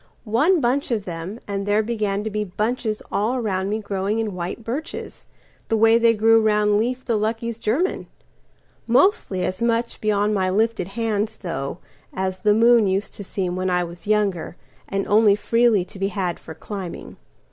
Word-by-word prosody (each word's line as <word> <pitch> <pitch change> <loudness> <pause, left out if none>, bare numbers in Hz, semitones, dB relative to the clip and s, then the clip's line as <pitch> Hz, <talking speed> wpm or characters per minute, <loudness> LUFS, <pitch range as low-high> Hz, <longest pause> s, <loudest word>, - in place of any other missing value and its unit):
One 295 - +3
bunch 270 +2 0
of 220 -5 -1
them, 175 +5 -6
and 200 0 -3
there 210 +1 +3
began 210 -3 -1
to 220 - -3
beBunches 215 +2 -2
all 235 +5 0
round 195 -4 -1
me 215 - 0
growing 200 0 -2
in 220 -3 -2
white 180 +5 -5
birches, 275 +9 -6 0.4
The 225 - +1
way 225 +1 +5
they 230 0 +4
grew 225 +1 +5
round 210 -1 +3
Leif 250 +3 -2
the 235 - +1
Lucky's 225 +2 -2
German; 270 - -1 0.8
Mostly 240 - +2
as 185 +3 -3
much 235 0 0
beyond 210 0 +1
my 190 -2 +1
lifted 215 -1 0
hands, 220 -2 -1
though, 165 -6 -4 0.4
As 190 0 -2
the 210 +2 +3
moon 230 -1 +5
used 195 +2 -1
to 205 - -7
seem 185 -2 -3
when 185 0 -1
I 180 0 +1
was 175 +3 -9
younger, 205 -6 0 0.3
And 195 0 -2
only 210 -1 +5
freely 230 -3 +2
to 190 - -12
be 195 - +1
had 185 -3 -2
for 160 - -10
climbing. 190 +1 -7
210 Hz, 175 wpm, -22 LUFS, 195-230 Hz, 0.8 s, way